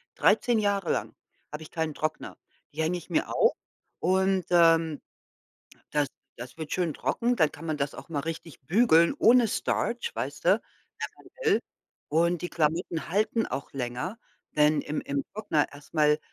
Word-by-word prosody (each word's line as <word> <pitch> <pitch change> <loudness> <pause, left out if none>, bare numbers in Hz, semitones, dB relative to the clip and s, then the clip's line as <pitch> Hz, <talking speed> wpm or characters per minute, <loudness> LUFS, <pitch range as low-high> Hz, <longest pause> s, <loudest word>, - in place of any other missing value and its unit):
13 240 -3 +3
Jahre 200 -3 +1
lang - - -2 0.4
habe 150 +1 -6
ich - - -13
keinen 160 -2 -2
Trockner. 155 +1 -4 0.4
Die 160 - -2
hänge 170 +3 0
ich 175 - -11
mir 165 - 0
auf - - +4 0.5
und, 190 +1 +2
ähm, 165 -3 +4 0.9
das 145 -2 +1 0.3
das 125 +4 -9
wird 155 -2 -6
schön 175 -4 0
trocken, 245 +1 0
dann 155 -3 +3
kann 160 - -11
man 155 -2 -1
das 140 0 -2
auch - - -10
mal 150 -3 -3
richtig 165 0 -6
bügeln 170 - +4
ohne 240 0 +6
Starch, 465 - -1
weißte, - - +1 0.6
wenn - - -17 0.2
man 440 - +4
will. - - +1 0.5
Und 170 +3 +2
die 175 - -2
Klamotten 165 +1 -1
halten 215 +5 +1
auch 140 - -5
länger, 135 - -4 0.3
denn 150 0 +4
im 150 - -3
im 140 0 -2
Trockner 200 -9 0
erst 145 +3 -15
mal 150 -1 +4
165 Hz, 165 wpm, -27 LUFS, 150-190 Hz, 0.9 s, ohne